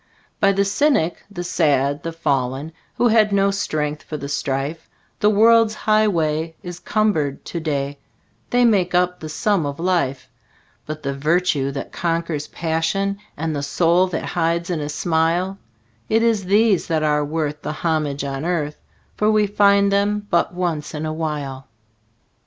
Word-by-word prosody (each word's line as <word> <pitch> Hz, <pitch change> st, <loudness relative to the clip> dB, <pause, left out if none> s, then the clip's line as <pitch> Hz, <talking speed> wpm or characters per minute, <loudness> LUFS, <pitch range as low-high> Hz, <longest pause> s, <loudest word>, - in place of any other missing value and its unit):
By 200 Hz, -, +4 dB
the 200 Hz, 0 st, +1 dB
cynic, 200 Hz, -, +1 dB
the 180 Hz, -4 st, -6 dB
sad, 145 Hz, -4 st, +1 dB
the 165 Hz, -, -4 dB
fallen, 140 Hz, -2 st, -1 dB, 0.2 s
Who 240 Hz, -, +3 dB
had 215 Hz, -2 st, +4 dB
no 200 Hz, 0 st, +3 dB
strength 150 Hz, -6 st, -2 dB
for 155 Hz, -, -6 dB
the 140 Hz, -1 st, -6 dB
strife, 140 Hz, +3 st, -3 dB, 0.3 s
The 210 Hz, -, +4 dB
world's 225 Hz, +1 st, +5 dB
highway 165 Hz, -8 st, +1 dB
is 175 Hz, -1 st, -7 dB
cumbered 175 Hz, -8 st, 0 dB
to 170 Hz, -, -4 dB
day 140 Hz, -3 st, -2 dB, 0.5 s
They 245 Hz, 0 st, +3 dB
make 185 Hz, -6 st, +2 dB
up 180 Hz, 0 st, +2 dB
the 155 Hz, -, -7 dB
sum 195 Hz, +3 st, +1 dB
of 145 Hz, 0 st, -4 dB
life; 170 Hz, -7 st, 0 dB, 0.6 s
But 155 Hz, 0 st, -6 dB
the 140 Hz, -, -2 dB
virtue 150 Hz, -1 st, +1 dB
that 140 Hz, -, -6 dB
conquers 165 Hz, -3 st, -2 dB
passion, 175 Hz, +5 st, -1 dB, 0.2 s
And 160 Hz, 0 st, -2 dB
the 140 Hz, -, -2 dB
sorrow 170 Hz, +5 st, +2 dB
that 170 Hz, -3 st, -4 dB
hides 170 Hz, 0 st, -1 dB
in 170 Hz, -, -1 dB
a 145 Hz, 0 st, -4 dB
smile 170 Hz, +5 st, 0 dB, 0.5 s
It 225 Hz, +1 st, +3 dB
is 220 Hz, -4 st, +1 dB
these 205 Hz, 0 st, +3 dB
that 160 Hz, -2 st, 0 dB
are 150 Hz, -1 st, +2 dB
worth 150 Hz, 0 st, -3 dB
the -, -, -4 dB
homage 155 Hz, -4 st, -1 dB
on 135 Hz, 0 st, -4 dB
earth, 155 Hz, -4 st, -1 dB, 0.4 s
For 210 Hz, -, +2 dB
we 215 Hz, -1 st, +3 dB
find 200 Hz, 0 st, +4 dB
them 205 Hz, +1 st, +1 dB
but 170 Hz, -, +2 dB
once 170 Hz, -5 st, -3 dB
in 150 Hz, +1 st, -3 dB
a 155 Hz, -, -2 dB
while. 145 Hz, -4 st, -4 dB
165 Hz, 165 wpm, -21 LUFS, 150-200 Hz, 0.6 s, world's